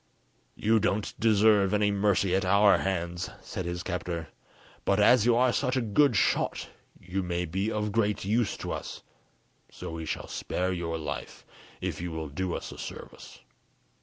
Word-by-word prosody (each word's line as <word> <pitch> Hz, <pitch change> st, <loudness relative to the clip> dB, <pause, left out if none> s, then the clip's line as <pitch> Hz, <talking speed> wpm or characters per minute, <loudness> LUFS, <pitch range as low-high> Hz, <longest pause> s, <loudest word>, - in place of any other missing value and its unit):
"You 110 Hz, +1 st, +2 dB
don't 100 Hz, 0 st, -1 dB
deserve 105 Hz, -2 st, +4 dB
any 105 Hz, 0 st, +2 dB
mercy 100 Hz, -2 st, +2 dB
at 95 Hz, -, +1 dB
our 100 Hz, +2 st, +5 dB
hands," 90 Hz, -1 st, -2 dB
said 95 Hz, -1 st, -5 dB
his 85 Hz, 0 st, -4 dB
captor 85 Hz, -3 st, -4 dB, 0.5 s
"but 100 Hz, -, +2 dB
as 115 Hz, +2 st, +5 dB
you 120 Hz, -, +5 dB
are 125 Hz, 0 st, +3 dB
such 130 Hz, -1 st, 0 dB
a -, -, +2 dB
good 120 Hz, +4 st, +3 dB
shot -, -, +1 dB, 0.3 s
you 95 Hz, +2 st, -3 dB
may 90 Hz, -1 st, -2 dB
be 95 Hz, +6 st, -2 dB
of 105 Hz, -1 st, -1 dB
great 105 Hz, -2 st, 0 dB
use 110 Hz, +2 st, +1 dB
to -, -, -5 dB
us, -, -, -6 dB, 0.7 s
so -, -, -8 dB
we 80 Hz, -1 st, -6 dB
shall -, -, -4 dB
spare 90 Hz, +1 st, -2 dB
your 85 Hz, -2 st, -3 dB
life, 80 Hz, -, -6 dB, 0.4 s
if -, -, -3 dB
you 90 Hz, -, -3 dB
will 80 Hz, -1 st, -5 dB
do 90 Hz, +5 st, -2 dB
us -, -, -6 dB
a -, -, -10 dB
service. -, -, -9 dB
95 Hz, 170 wpm, -28 LUFS, 90-105 Hz, 0.7 s, our